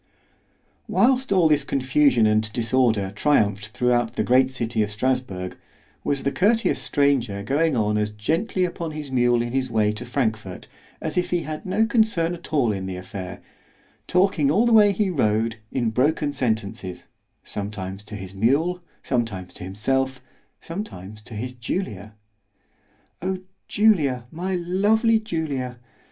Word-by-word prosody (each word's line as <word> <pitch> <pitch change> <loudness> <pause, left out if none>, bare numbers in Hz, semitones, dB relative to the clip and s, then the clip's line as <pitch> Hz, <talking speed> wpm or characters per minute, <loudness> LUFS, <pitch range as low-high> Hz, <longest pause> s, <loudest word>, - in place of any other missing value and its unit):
_ - - -43 0.8
Whilst 260 0 +2
all 185 -4 +5
this 150 -2 +3
confusion 135 -3 +3
and 110 0 +2
disorder 115 -4 +1
triumphed 105 -6 +2
throughout 120 +1 0
the - - +1
great 130 +1 +4
city 115 -3 -1
of 105 - 0
Strasburg, 105 -5 -2 0.5
was 140 -1 -1
the 140 - +1
courteous 215 - +2
stranger 135 -9 +1
going 145 +3 +1
on 105 -1 +1
as 105 0 0
gently 165 - 0
upon 170 -2 -4
his 150 -3 -6
mule 120 -2 +3
in 120 0 -5
his 130 -1 0
way 110 -2 +2
to 105 +3 -6
Frankfort, 110 -7 -2 0.3
as 160 +2 0
if 180 - -2
he 175 -1 +1
had 155 +3 -6
no 215 +4 +2
concern 215 -8 +2
at 170 -1 -10
all 135 -8 +2
in 95 -2 -4
the 95 - -4
affair——talking 140 - -3
all 210 +11 +3
the 235 - +3
way 210 -2 +7
he 200 0 0
rode 110 -5 +1
in 120 -4 0
broken 145 +4 +1
sentences, 105 -7 -2 0.4
sometimes 100 -1 -5
to 105 0 -8
his 95 -2 -8
mule—sometimes 120 - -1
to - - -9
himself—sometimes 130 - -4
to 110 +1 -11
his 125 +4 -4
Julia. 110 - -4 1.1
O 190 +2 -1 0.3
Julia, 150 - +2
my 185 +3 -2
lovely 210 +6 +2
Julia! 145 - -3
130 Hz, 145 wpm, -23 LUFS, 105-165 Hz, 1.1 s, way